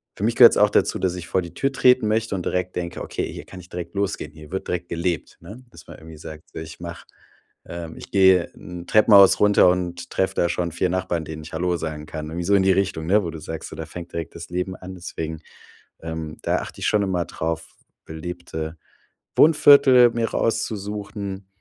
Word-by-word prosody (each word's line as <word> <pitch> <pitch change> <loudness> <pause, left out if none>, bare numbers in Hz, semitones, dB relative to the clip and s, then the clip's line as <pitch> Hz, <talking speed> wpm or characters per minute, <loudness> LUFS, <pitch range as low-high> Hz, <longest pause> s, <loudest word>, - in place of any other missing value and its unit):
für 100 - -6
mich 115 +1 +1
gehört's 120 -2 +8
auch 105 0 +5
dazu, - - +1
dass 90 -1 0
ich 90 -2 -7
vor 95 - +1
die 85 -1 -9
Tür 135 0 0
treten 125 -4 +4
möchte 110 -1 0
und 90 - -4
direkt 90 0 -2
denke: 85 -1 -4
„Okay, - - -4
hier - - -9
kann 95 - -11
ich 90 - -14
direkt 85 +1 -7
losgehen. 100 -7 -2
Hier 75 0 -14
wird 95 - -4
direkt 90 0 -3
gelebt,“ 85 0 -3
ne? 120 +5 -11
Dass - - -16
man - - -11
irgendwie 80 -1 -12
sagt: 80 +1 -11
„Ich 80 0 -8
mache 85 0 -8 0.6
ähm, 85 -1 -8
ich - - -11
gehe 95 -3 +5
in 90 -1 -9
Treppenhaus 100 -3 +6
runter 105 -3 +6
und 90 -1 -2
treffe 95 - 0
da 85 - +2
schon 85 -1 -2
4 90 +2 0
Nachbarn, 90 -3 -2
denen 80 0 -7
ich 80 - -11
Hallo 90 +2 0
sagen 75 -2 -5
kann.“ 75 -1 -6
Irgendwie 85 +1 -4
so 100 - +3
in 95 - +4
die 95 - +4
Richtung, 90 -4 -1
wo 85 - -3
du 80 - -8
sagst: 80 +1 -7
„Da 80 - -5
fängt 85 +2 -9
direkt 85 -1 -5
das 85 0 -9
Leben 90 +1 -3
an.“ 95 0 -9
Deswegen, 80 -2 -6 0.6
ähm, 80 -1 -6
da - - 0
achte - - -9
ich - - 0
schon 105 -1 +2
immer 90 -3 -1
drauf, 80 0 -4 0.3
belebte 80 -1 -6 0.6
Wohnviertel 140 -5 +7
mir 115 -1 -1
rauszusuchen, 100 -3 -3
90 Hz, 210 wpm, -23 LUFS, 80-100 Hz, 0.6 s, gehört's